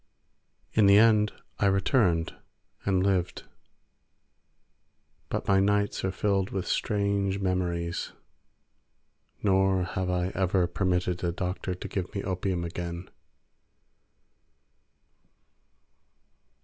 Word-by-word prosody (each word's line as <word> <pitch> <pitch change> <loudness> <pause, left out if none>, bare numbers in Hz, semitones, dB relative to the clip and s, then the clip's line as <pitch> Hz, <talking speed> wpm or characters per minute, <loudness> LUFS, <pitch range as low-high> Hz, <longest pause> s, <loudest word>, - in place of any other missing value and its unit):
In 105 -2 +5
the 100 +1 +7
end 105 -1 +5 0.3
I 100 - +3
returned 95 -3 +2 0.5
and 95 -2 +2
lived, 95 -3 0 1.9
but - - -3
my 95 -1 +4
nights 100 +1 +1
are 95 - 0
filled 95 0 0
with 95 -2 -3
strange 100 -2 0
memories, 90 -3 -2 1.3
nor 95 -1 +3
have 95 0 -3
I 90 0 0
ever 95 -1 +1
permitted 90 0 -1
a 85 - +1
doctor 90 +1 -3
to - - -7
give 95 +2 -4
me 100 - -2
opium 95 -1 -2
again. 85 +1 -6
95 Hz, 95 wpm, -28 LUFS, 90-100 Hz, 1.9 s, the